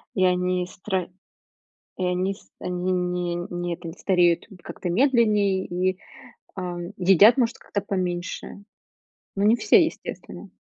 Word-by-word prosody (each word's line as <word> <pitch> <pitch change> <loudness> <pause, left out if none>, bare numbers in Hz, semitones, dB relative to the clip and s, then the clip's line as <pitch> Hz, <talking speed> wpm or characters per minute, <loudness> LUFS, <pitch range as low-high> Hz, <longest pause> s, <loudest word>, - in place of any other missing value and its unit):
И 185 - +3
они 180 0 +1
стро 185 -1 -3 0.9
и 185 - -1
они 180 +2 0
с - - -21
они 180 +1 -2
не 180 -1 -1
не, 175 0 -3
это, 170 0 -9
не 165 - -7
стареют 175 -3 +2 0.2
как-то 175 - -5
медленнее 210 -5 +3
и, 185 +1 -1 0.6
ам, 175 -1 -5
едят, 195 +5 +6
может, 235 -2 +1
как-то 205 - -4
поменьше. 180 -3 -3 0.8
Но 200 - +1
не 215 +3 +6
все, 215 +9 +5
естественно. 325 - -7
185 Hz, 135 wpm, -24 LUFS, 180-200 Hz, 0.9 s, едят